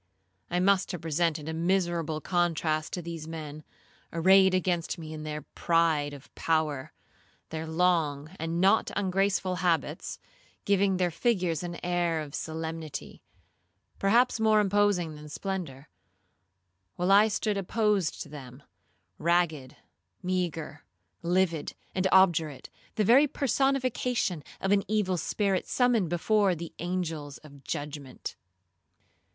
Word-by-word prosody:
I 175 - 0
must 195 +1 +3
have 175 - -5
presented 160 -1 0
a 160 - -3
miserable 170 -2 0
contrast 165 -3 0
to 180 - -3
these 165 -2 -6
men 155 -2 -7 0.5
arrayed 190 +2 +5
against 180 -2 0
me 160 -2 -7
in 155 - -6
their 150 -1 -5
pride 165 -3 +1
of 140 -1 -12
power,—their 160 +1 -4
long 160 -4 +1
and 165 +1 -2
not 195 +4 +4
ungraceful 190 -1 0
habits, 165 -4 -1 0.5
giving 200 -1 +3
their 180 -1 +1
figures 180 - 0
an 175 -1 -5
air 175 -2 +1
of 145 -2 -8
solemnity, 160 -2 -5 0.8
perhaps 235 +5 +3
more 220 -1 +4
imposing 200 -5 +2
than 150 0 -10
splendour—while 95 - -7
I 205 +2 +7
stood 215 0 -1
opposed 200 -2 0
to - - -14
them, 135 -2 -10 0.6
ragged, 165 -6 +1 0.5
meagre, 170 -5 -2 0.4
livid, 170 -3 0 0.2
and 190 0 +1
obdurate, 165 -7 +3 0.2
the 215 - +2
very 260 +8 +6
personification 255 - 0 0.2
of 195 - -1
an 205 -1 +4
evil 205 -4 +1
spirit 195 +2 0
summoned 240 -8 +2
before 195 +2 +2
the 170 0 -7
angels 165 -5 -3
of 140 -2 -14
judgment. 145 -2 -6
170 Hz, 120 wpm, -28 LUFS, 155-190 Hz, 0.8 s, I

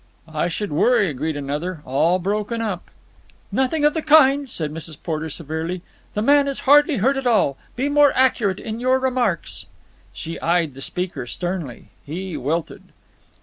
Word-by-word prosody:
"I 160 +1 -1
should 200 +4 -3
worry!" 200 +3 +3
agreed 150 +3 -3
another. 150 +4 -4
"All 160 +7 +2
broken 210 +5 -2
up." 210 -6 -4 0.6
"Nothing 280 +3 +1
of 295 - +4
the 320 - -1
kind," 285 -3 +5
said 155 -8 -3
Mrs. 160 -1 -7
Porter 160 -1 -3
severely. 165 +3 -4 0.3
"The 210 - 0
man 285 +3 +5
is 275 - -3
hardly 290 +1 +5
hurt 265 +7 +2
at 270 -2 -1
all. 210 - +3 0.2
Be 260 +3 0
more 290 -1 +5
accurate 235 -7 +2
in 220 +1 -5
your 255 +1 +3
remarks." 250 -9 -1 0.4
She 160 - -6
eyed 170 -3 +1
the 135 - -10
speaker 170 -7 -4
sternly. 170 - -5
He 175 +4 -5
wilted. 155 +6 -2
185 Hz, 160 wpm, -22 LUFS, 160-260 Hz, 0.6 s, kind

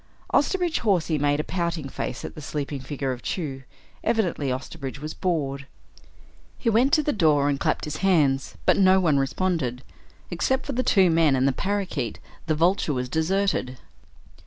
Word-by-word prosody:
Osterbridge 350 +2 +2
Hawsey 175 -8 +1
made 145 0 +1
a - - 0
pouting 170 -5 -2
face 130 - -5
at - - -7
the 155 - -9
sleeping 145 -1 -4
figure 135 0 -3
of 125 -1 -5
Chew; 140 -7 -4 0.4
evidently 175 - 0
Osterbridge 135 +1 -5
was 155 +2 -6
bored. 140 -6 -2 0.9
He 230 - 0
went 245 +6 +3
to 310 -2 +4
the 295 - 0
door 150 -7 +3
and 140 -1 0
clapped - - 0
his 150 0 -4
hands, 150 -9 +2
but - - +4
no 190 -1 +5
one 155 -6 +3
responded. 135 -4 -1 0.5
Except 265 0 0
for 280 - -3
the 255 - 0
two 190 -8 +4
men 160 -4 +4
and 130 +1 +2
the - - +3
parakeet, 195 - -2 0.3
the 155 - +1
Vulture 170 -1 +2
was 125 0 -2
deserted. 160 -5 0
155 Hz, 170 wpm, -25 LUFS, 140-190 Hz, 0.9 s, no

